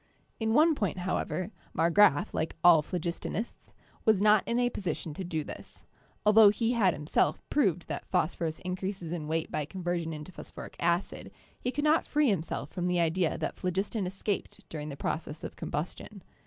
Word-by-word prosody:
In 220 0 +1
one 315 +3 +6
point, 205 -10 -1
however, 180 0 -2 0.3
Marggraf, 170 -1 +4
like 160 - -2
all 175 -3 +8
phlogistonists, 175 +7 -4 0.3
was 215 -3 +4
not 210 0 +5
in 235 - +1
a 245 0 +2
position 165 -6 -3
to 190 - -5
do 165 -4 -2
this; - - -9 0.4
altho 210 0 +8
he 225 +3 +1
had 205 -7 +3
himself 150 +2 +1
proved 185 - +2
that 145 - -5
phosphorus 160 -1 0
increases 185 -2 -3
in 165 -3 -4
weight 160 +1 -1
by 150 - -1
conversion 175 -1 -3
into 155 +3 -7
phosphoric - - -10
acid, 170 +2 0 0.3
he 250 - -2
could 280 +4 -2
not 305 +2 +3
free 295 -5 +3
him 190 -6 +1
self 150 -3 -5
from 180 -1 -2
the 180 -1 +1
idea 170 0 +1
that - - -3
phlogiston 190 +2 -1
escaped 195 +2 -4
during 150 -1 -5
this 140 - -6
process 155 +1 -3
of - - -6
combustion. 175 +5 -5
180 Hz, 175 wpm, -30 LUFS, 160-210 Hz, 0.4 s, all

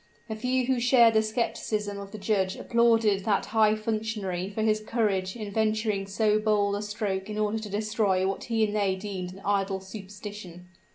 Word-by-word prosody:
The 220 - -3
few 250 +3 0
who 260 -1 +1
shared 240 -2 +5
the 220 - +4
skepticism 215 -2 -2
of 200 0 -9
the 215 - -7
judge 195 -2 0
applauded 225 -4 +2
that 210 -2 +1
high 215 -1 +3
functionary 215 -4 -3
for 215 +2 -3
his 215 -1 +2
courage 205 -4 -1
in 215 -3 -6
venturing 215 -2 0
so 210 +1 +2
bold 210 -2 +2
a 205 - -3
stroke 210 -2 -3
in 210 - -4
order 215 +1 0
to 215 -1 -7
destroy 205 -2 +1
what 195 - -3
he 225 -2 +2
and 210 0 -3
they 200 -2 +1
deemed 190 -2 -5
an 190 +1 -13
idle 195 -1 0
superstition. 190 -2 -9
210 Hz, 185 wpm, -27 LUFS, 195-220 Hz, -, shared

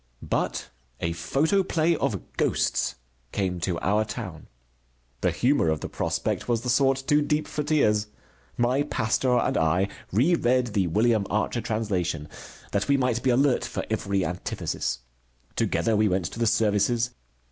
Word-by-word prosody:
But - - -1 0.3
a 85 0 -1
photoplay 160 - +1
of 130 - -1 0.2
Ghosts - - +1 0.4
came 95 -3 -1
to 85 0 -1
our 105 +3 +2
town. - - -7 0.7
The - - +3
humor 130 - +2
of 80 -1 -1
the - - -4
prospect - - -2
was 115 -2 +1
the 125 0 -1
sort 135 +1 +3
too 150 +1 +3
deep 150 +1 0
for 150 - -3
tears. 110 -9 +2 0.5
My 125 +3 +2
pastor 125 -2 +1
and 130 +2 +1
I 90 +5 +2 0.2
reread 125 - +2
the 95 -3 +2
William 110 +3 +2
Archer 110 +3 0
translation 90 -9 -2 0.4
that 100 0 0
we 140 - +4
might 125 -3 +1
be 130 - +1
alert 130 +1 +3
for - - -4
every 100 -2 0
antithesis. 85 -7 -3 0.5
Together 115 -1 +1
we 105 0 +3
went 90 -1 0
to - - -8
the 115 - +2
services. 115 +2 +2
115 Hz, 150 wpm, -26 LUFS, 100-135 Hz, 0.7 s, we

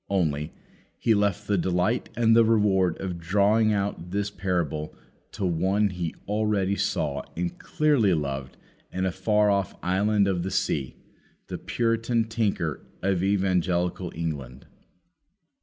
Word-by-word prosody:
Only, 80 -5 0 0.5
He 115 - +2
left 100 -1 +1
the 100 -2 +1
delight 90 +7 0
and 115 -1 +4
the 115 - +7
reward 100 -6 +2
of 90 -3 -4
drawing 105 +5 +3
out 100 -4 -2
this 100 +2 -2
parable 85 -6 -2 0.4
to 100 - -2
one 95 +4 +1
He 90 -3 -4
already 105 -2 +1
saw 70 -6 -1 0.2
and 90 0 -1 0.3
dearly 140 - +4
loved 70 -3 -4 0.3
in 95 0 -1
a 95 - +1
far 105 +3 +2
off 100 -1 0
island 100 +2 +2
of 95 -3 0
the 95 - -2
sea, 70 -8 -1 0.5
the - - -5
Puritan 115 0 0
tinker 110 - -1 0.2
of 95 -2 +1
Evangelical 90 -2 0
England. 70 -6 -5
95 Hz, 135 wpm, -26 LUFS, 85-105 Hz, 0.5 s, the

